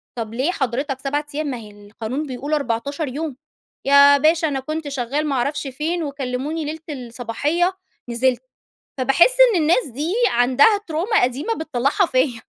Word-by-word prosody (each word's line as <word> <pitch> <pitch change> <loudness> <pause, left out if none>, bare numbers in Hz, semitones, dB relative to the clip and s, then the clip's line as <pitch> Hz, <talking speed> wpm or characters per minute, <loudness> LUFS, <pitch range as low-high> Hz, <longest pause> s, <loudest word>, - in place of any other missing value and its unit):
"طب 225 -2 -5
ليه 265 +9 0
حضرتك 270 -1 -2
7 285 +2 -2
أيام 305 0 -2
ما 260 -3 -3
هي 215 -3 -11 0.2
القانون 225 +7 -4
بيقول 275 +3 -4
14 280 +2 -1
يوم." 290 +2 -4 0.5
"يا 280 +1 +7
باشا 315 +3 +3
أنا 275 -3 -2
كنت 310 +3 -5
شغّال 280 +2 -2
ما 280 - -1
أعرفش 285 +3 -1
فين 315 +6 -2
وكلّموني 280 +2 -3
ليلة 310 +2 -5
الصباحية 285 +7 -2 0.3
نزلت." 245 +2 +1 0.6
فباحس 270 - +4 0.2
إن 340 - +2
الناس 345 +10 +3
دي 295 - -3 0.2
عندها 255 - +4
ترومة 355 +8 +1
قديمة 265 - 0
بتطلّعها 310 - 0
فيّا. 255 -5 0
280 Hz, 155 wpm, -21 LUFS, 255-310 Hz, 0.6 s, يا